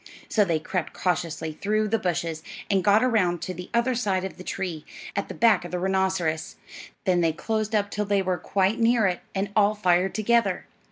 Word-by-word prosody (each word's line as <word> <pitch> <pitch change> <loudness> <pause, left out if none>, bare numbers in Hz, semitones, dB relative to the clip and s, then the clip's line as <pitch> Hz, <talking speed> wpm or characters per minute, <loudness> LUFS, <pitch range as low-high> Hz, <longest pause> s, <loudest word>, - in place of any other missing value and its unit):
So 215 - +4
they 170 -5 +1
crept 170 +2 -3
cautiously 165 -3 -1
through 215 +6 0
the 225 +2 +1
bushes 165 -3 -2 0.3
and 195 -2 +2
got 210 +3 +5
around 195 -9 +2
to 185 - -3
the 180 +1 -8
other 235 +2 +2
side 200 -6 0
of 190 - -5
the 185 - -9
tree, 180 -5 -4 0.3
at 200 - -1
the - - -7
back 220 -6 +4
of 175 - -7
the 180 - -3
rhinoceros; 190 -4 0 0.5
then 180 -2 +3
they 165 -1 +2
closed 215 +5 -2
up 205 -1 +1
till 210 0 -1
they 200 -1 +1
were 185 -2 -1
quite 195 +6 +1
near 230 -1 +4
it, 180 -2 +1 0.2
and 195 +1 -1
all 210 0 +4
fired 185 -2 +2
together. 230 +2 +1
190 Hz, 205 wpm, -25 LUFS, 180-215 Hz, 0.5 s, got